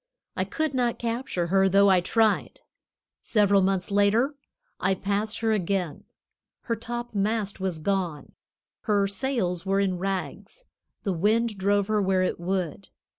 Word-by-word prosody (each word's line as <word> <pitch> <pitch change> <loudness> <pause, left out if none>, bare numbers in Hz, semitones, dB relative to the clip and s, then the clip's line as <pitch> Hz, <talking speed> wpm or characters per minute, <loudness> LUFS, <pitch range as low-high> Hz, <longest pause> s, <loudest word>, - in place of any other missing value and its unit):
I - - -1
could 315 -2 -2
not 245 -2 0
capture 230 -6 -2
her, 195 0 +4
though 200 +1 +5
I 185 -1 +4
tried. 220 +3 +1 0.6
Several 200 -3 +3
months 190 0 0
later 205 +7 +3 0.5
I 190 +1 +1
passed 205 +4 -2
her 225 -1 +2
again. 190 -5 -1 0.6
Her 230 - -2
topmast 225 -3 -2
was 190 -3 -2
gone; 175 -2 -2 0.5
her 205 -3 +2
sails 195 -5 -1
were 195 0 +1
in 190 -3 0
rags; 195 - -4 0.4
the 195 - 0
wind 215 +5 +1
drove 200 +1 +1
her 215 0 +1
where 190 -1 +2
it 185 - -1
would. 185 0 -3
200 Hz, 140 wpm, -26 LUFS, 190-225 Hz, 0.6 s, though